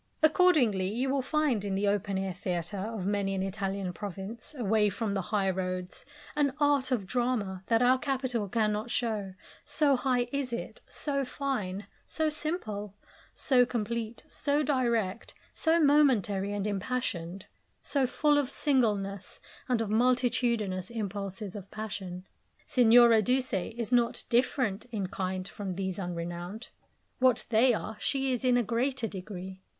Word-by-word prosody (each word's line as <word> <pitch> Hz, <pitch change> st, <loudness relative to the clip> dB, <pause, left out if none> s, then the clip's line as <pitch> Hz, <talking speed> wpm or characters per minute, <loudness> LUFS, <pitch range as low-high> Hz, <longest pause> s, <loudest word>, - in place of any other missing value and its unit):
Accordingly, 300 Hz, -, +4 dB
you 255 Hz, +4 st, 0 dB
will 275 Hz, -1 st, +1 dB
find 275 Hz, -6 st, +1 dB
in 200 Hz, -1 st, -2 dB
the 200 Hz, +1 st, +1 dB
open 200 Hz, -1 st, 0 dB
air 190 Hz, -1 st, -2 dB
theatre 175 Hz, +1 st, -3 dB, 0.2 s
of 210 Hz, -5 st, -4 dB
many 200 Hz, -1 st, 0 dB
an 190 Hz, -, -1 dB
Italian 195 Hz, -1 st, -3 dB
province, 205 Hz, -, -6 dB
away 215 Hz, -2 st, +2 dB
from 200 Hz, +1 st, -2 dB
the 195 Hz, -, 0 dB
high 205 Hz, -2 st, +1 dB
roads, 185 Hz, -1 st, -4 dB, 0.3 s
an 285 Hz, -3 st, +2 dB
art 285 Hz, -3 st, +3 dB
of 225 Hz, -6 st, 0 dB
drama 220 Hz, -4 st, -1 dB
that 230 Hz, +1 st, +3 dB
our 255 Hz, +1 st, +5 dB
capital 255 Hz, -6 st, -1 dB
cannot 215 Hz, +1 st, 0 dB
show, 215 Hz, -6 st, -2 dB, 0.3 s
so 290 Hz, -1 st, +3 dB
high 250 Hz, -1 st, +1 dB
is 275 Hz, -3 st, -2 dB
it, 235 Hz, -, -5 dB
so 280 Hz, -2 st, -2 dB
fine, 215 Hz, -8 st, -3 dB, 0.2 s
so 315 Hz, -1 st, -1 dB
simple, 220 Hz, -, -4 dB, 0.4 s
so 255 Hz, -3 st, +3 dB
complete, 235 Hz, -1 st, -3 dB
so 290 Hz, +1 st, 0 dB
direct, 235 Hz, -8 st, 0 dB, 0.2 s
so 325 Hz, +1 st, +2 dB
momentary 250 Hz, -, +3 dB
and 205 Hz, -1 st, -2 dB
impassioned, 195 Hz, -4 st, -3 dB, 0.4 s
so 275 Hz, -3 st, +1 dB
full 295 Hz, +3 st, +3 dB
of 275 Hz, -3 st, -1 dB
singleness 210 Hz, -, 0 dB, 0.3 s
and 245 Hz, -3 st, +2 dB
of 215 Hz, -2 st, -2 dB
multitudinous 235 Hz, -5 st, +1 dB
impulses 200 Hz, -2 st, -4 dB
of 200 Hz, -1 st, -8 dB
passion. 190 Hz, -4 st, -6 dB, 0.4 s
Signora 235 Hz, -2 st, +6 dB
Duse 255 Hz, +3 st, 0 dB
is 225 Hz, +5 st, -3 dB
not 240 Hz, -1 st, +2 dB
different 240 Hz, -4 st, +1 dB
in 220 Hz, -6 st, -3 dB
kind 185 Hz, 0 st, -3 dB
from 190 Hz, +2 st, -5 dB
these 190 Hz, 0 st, -3 dB
unrenowned. 175 Hz, +4 st, -5 dB, 0.5 s
What 255 Hz, -2 st, +3 dB
they 235 Hz, +2 st, +5 dB
are, 215 Hz, 0 st, -5 dB
she 270 Hz, -1 st, 0 dB
is 245 Hz, -, -2 dB
in 250 Hz, -1 st, +4 dB
a 245 Hz, -, +2 dB
greater 240 Hz, +2 st, 0 dB
degree. 190 Hz, -1 st, -7 dB
220 Hz, 145 wpm, -29 LUFS, 195-255 Hz, 0.5 s, Signora